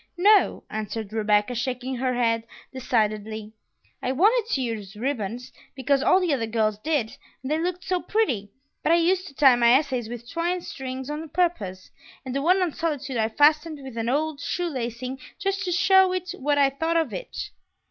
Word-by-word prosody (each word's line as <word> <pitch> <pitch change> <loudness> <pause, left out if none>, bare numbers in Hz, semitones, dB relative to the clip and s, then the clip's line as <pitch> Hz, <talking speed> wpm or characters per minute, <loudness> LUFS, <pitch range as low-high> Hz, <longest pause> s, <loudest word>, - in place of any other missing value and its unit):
"No," 410 +3 +4
answered 215 0 -4
Rebecca, 210 +1 +2
shaking 250 +1 -3
her 255 0 0
head 230 -2 +1 0.3
decidedly; 215 -3 -1 0.5
"I 255 - -1
wanted 440 - +3
to 270 - +1
use 215 -4 -5
ribbons, 240 -1 -3 0.2
because 275 +1 +1
all 370 - +4
the 355 -5 +1
other 230 -5 -1
girls 215 -2 0
did, 285 -4 -1 0.3
and 265 - -4
they 310 - +1
looked 360 +2 -2
so 365 -1 -1
pretty, 250 - 0 0.3
but - - +1
I - - +7
used 365 +2 +2
to 275 - -13
tie 265 -3 +6
my 235 -1 +4
essays 260 -5 +1
with 235 0 -8
twine 345 +4 -1
strings 265 -2 -6
on 310 +1 -5
purpose; 285 - -1 0.3
and 255 - -4
the 275 - -1
one 365 +5 +3
on 340 -4 -1
solitude 290 -5 -3
I 220 0 +1
fastened 300 +5 +3
with 265 -3 -9
an 230 0 -2
old 300 +2 0
shoelacing 260 -6 -3 0.2
just 390 0 -2
to 360 - -1
show 375 +1 +5
it 365 -1 -3
what 290 +2 +1
I 275 -1 +4
thought 325 +4 0
of 320 -6 0
it!" - - -6
270 Hz, 185 wpm, -25 LUFS, 230-335 Hz, 0.5 s, I